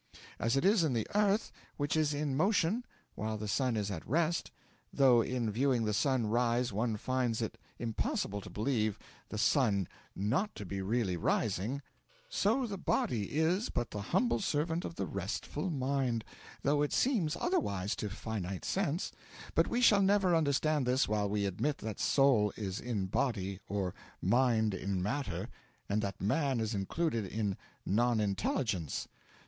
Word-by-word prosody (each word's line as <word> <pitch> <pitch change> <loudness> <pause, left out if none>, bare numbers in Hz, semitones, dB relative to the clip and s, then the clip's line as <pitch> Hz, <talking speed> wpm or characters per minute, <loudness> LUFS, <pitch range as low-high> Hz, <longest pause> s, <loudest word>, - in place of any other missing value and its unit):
As 115 +4 +1
it 135 - +1
is 200 0 +5
the 125 -9 +1
earth 210 +1 +2 0.3
which 145 +1 0
is 155 -2 +2
in 145 -2 -1
motion, 195 - +2 0.3
while 110 0 -3
the 105 0 -5
sun 120 +2 +1
is 105 -1 -1
at 85 -5 -4
rest, 165 +4 +1 0.4
though 130 -4 +5
in 120 -2 -1
viewing 125 0 +2
the 105 - 0
sun 130 +1 +2
rise 120 +1 +1
one 110 +1 0
finds 125 -1 0
it 115 0 -2 0.2
impossible 105 -3 -2
to - - -9
believe 110 -2 0 0.3
the 110 - -5
sun 105 - +3 0.3
not 125 - 0
to 105 - -6
be 95 +1 -4
really 100 -2 0
rising, 115 - 0 0.5
so 270 - +2
the 200 -4 -5
body 120 - 0
is 175 +8 +2
but 120 - -2
the 105 - -4
humble 190 - +1
servant 165 -2 0
of 170 - -6
the - - -2
restful 100 - -3
Mind, 130 -5 0 0.4
though 145 +1 +3
it 145 - 0
seems 195 - +2
otherwise 100 - 0
to 105 - -3
finite 100 -3 -4
sense; 180 -3 -1 0.4
but - - +3
we 240 - 0
shall 210 -4 +6
never 195 -2 +4
understand 150 -2 +2
this 130 +2 +3
while 105 -1 0
we 100 0 0
admit 135 +10 -1
that 110 -2 -5
soul 130 -7 +4
is 100 -2 -3
in 115 -6 -2
body, 95 -2 -1
or 95 -3 -1 0.3
mind 115 -4 +3
in 95 0 -2
matter, 105 -4 -2 0.4
and 105 +1 +1
that 100 -2 -3
man 135 +4 +1
is 110 0 -1
included 110 - -1
in 105 -1 -1 0.3
non 120 +3 +2
intelligence. 100 - -1
120 Hz, 160 wpm, -33 LUFS, 105-150 Hz, 0.5 s, shall